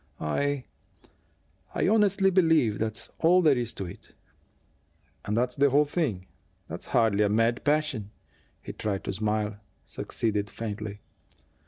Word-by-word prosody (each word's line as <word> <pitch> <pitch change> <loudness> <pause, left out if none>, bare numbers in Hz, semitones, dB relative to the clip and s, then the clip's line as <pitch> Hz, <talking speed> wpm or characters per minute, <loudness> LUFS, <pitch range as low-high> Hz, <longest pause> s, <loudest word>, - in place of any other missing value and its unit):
I 135 - -1 1.1
I - - +1
honestly 200 -2 +3
believe 160 - +3
that's 110 0 -3
all 180 +2 +5
there 150 -4 +5
is 120 -2 -2
to 95 - -4
it." 85 - -12 1.1
"If 105 - 0
that's 125 +2 0
the 140 0 +4
whole 145 +3 +4
thing, 140 - -2 0.4
that's - - -8
hardly 110 -3 +3
a 105 - +2
mad 115 +3 +1
passion." 145 -8 0 0.5
He - - -7
tried 100 -3 -3
to - - -3
smile; 105 0 -1 0.3
succeeded 105 -2 -2
faintly. 105 -1 -6
115 Hz, 135 wpm, -27 LUFS, 105-150 Hz, 1.1 s, all